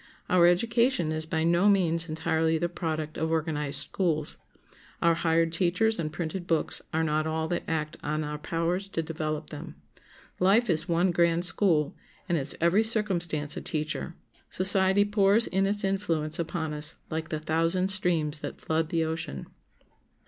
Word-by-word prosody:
Our 175 -1 +5
education 230 0 +2
is 155 0 -2
by 160 0 -1
no 170 +4 +3
means 170 -4 +1
entirely 160 0 0
the 170 +2 -1
product 160 -3 -4
of 160 +1 -1
organized 150 -3 +1
schools. 155 -5 -1 0.6
Our 170 0 +3
hired 165 0 +1
teachers 185 +5 +1
and 155 -2 -2
printed 170 +2 -5
books 165 -2 +1
are 160 +1 0
not 155 0 0
all 160 0 -2
that 175 - -1
act 155 -2 -3
on 155 +1 -2
our 150 0 -5
powers 170 +5 -2
to 165 -4 -3
develop 155 -1 -4
them. 155 +1 -8 0.6
Life 200 +4 +3
is 160 0 -1
one 175 +2 +2
grand 170 0 +2
school, 170 -5 +2 0.3
and 175 - 0
its 145 -3 -1
every 170 +6 +3
circumstance 175 -9 0
a - - -5
teacher. 155 +2 -3 0.3
Society 190 +1 +4
pours 205 +2 +3
in 195 +1 0
its 205 +1 0
influence 170 -6 0
upon 160 -2 -3
us 150 0 -1 0.2
like 160 0 -3
the 155 -3 -2
thousand 165 +4 0
streams 170 -6 +1
that - - -6
flood 160 0 -1
the 165 -1 0
ocean. 160 - -4
165 Hz, 165 wpm, -27 LUFS, 155-185 Hz, 0.6 s, Our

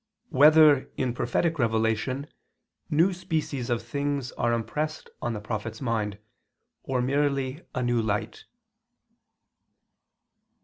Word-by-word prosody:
2] 140 - -5
Whether, 150 -2 +7
in 130 -2 0
Prophetic 155 +7 0
Revelation, 110 +4 0 0.6
New 170 +6 +3
Species 155 -8 -3
of 120 -1 0
Things 140 -3 -2
Are 120 - 0
Impressed 150 +7 -3
on 120 - -1
the 105 - -4
Prophet's 110 +1 -5
Mind, 110 -5 -1 0.6
or 130 -2 -1
Merely 140 +1 0
a 125 - 0
New 120 -1 +2
Light? 105 -2 -3
130 Hz, 115 wpm, -27 LUFS, 115-145 Hz, 0.6 s, Whether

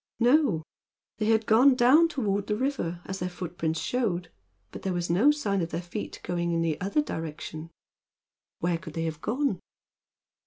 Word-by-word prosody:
No; 245 - +3 0.6
they 215 - 0
had 220 0 +3
gone 255 +5 +6
down 265 +7 +6
toward 205 - -1
the 210 - 0
river, 210 -9 -2
as 190 0 -5
their 180 - -2
footprints 170 -3 -3
showed, 180 -9 -1 0.4
but - - -8
there 190 - -1
was 175 -1 -1
no 205 +12 +5
sign 210 -11 +1
of 165 - -2
their 165 - -3
feet 175 +5 -6
going 170 -1 -1
in 165 0 +1
the 160 -2 -1
other 200 +11 +1
direction. 160 - -6 0.9
Where 170 -1 0
could 165 -4 -10
they 165 - -1
have 160 -1 -4
gone? 250 -4 0
190 Hz, 170 wpm, -27 LUFS, 170-240 Hz, 0.9 s, gone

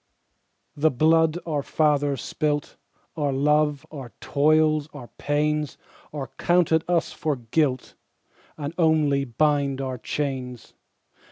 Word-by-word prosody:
The 155 +2 +3
blood 160 +4 +3
our 150 -4 -1
fathers 145 -3 +1
spilt, 150 0 -2 0.4
Our 145 -3 0
love, 150 +1 +1
our 135 -6 -9
toils, 155 +1 +2
our 125 -4 -9
pains, 150 0 -1 0.3
Are 135 -3 -6
counted 170 -2 +3
us 175 -2 +1
for 155 -2 -2
guilt, 130 +2 -1 0.6
And 150 0 -5
only 150 -4 +3
bind 140 +1 +1
our 130 -2 -4
chains. 130 -2 -4
150 Hz, 110 wpm, -24 LUFS, 140-155 Hz, 0.6 s, The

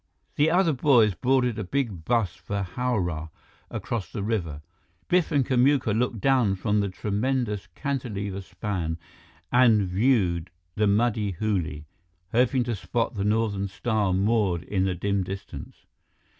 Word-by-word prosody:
The 150 +2 +3
other 170 -1 +3
boys 120 -6 +4
boarded 125 +1 +1
a - - -2
big 100 - -2
bus 115 -3 +1
for 100 0 -4
Howrah, 90 -7 -2 0.4
across 115 -5 -4
the 105 - -4
river. 85 -9 -2 0.4
Biff 180 -2 +2
and 140 -4 +2
Kamuka 130 -2 +3
looked 120 -1 0
down 125 -5 +3
from 105 +2 0
the 100 -1 0
tremendous 105 +1 -1
cantilever 105 -9 -3
span 90 -3 -3 0.5
and 120 -4 +5
viewed 90 -5 +1 0.2
the 105 0 +1
muddy 105 -1 +1
Hooghly, 85 -7 -2 0.5
hoping 125 +2 +3
to 120 -1 -2
spot 115 +4 -2
the 100 -3 -2
Northern 105 -2 0
Star 105 +1 -1
moored 95 -3 +1
in 95 0 0
the 95 -1 0
dim 100 +2 0
distance. 95 +1 -8
105 Hz, 140 wpm, -26 LUFS, 95-125 Hz, 0.5 s, and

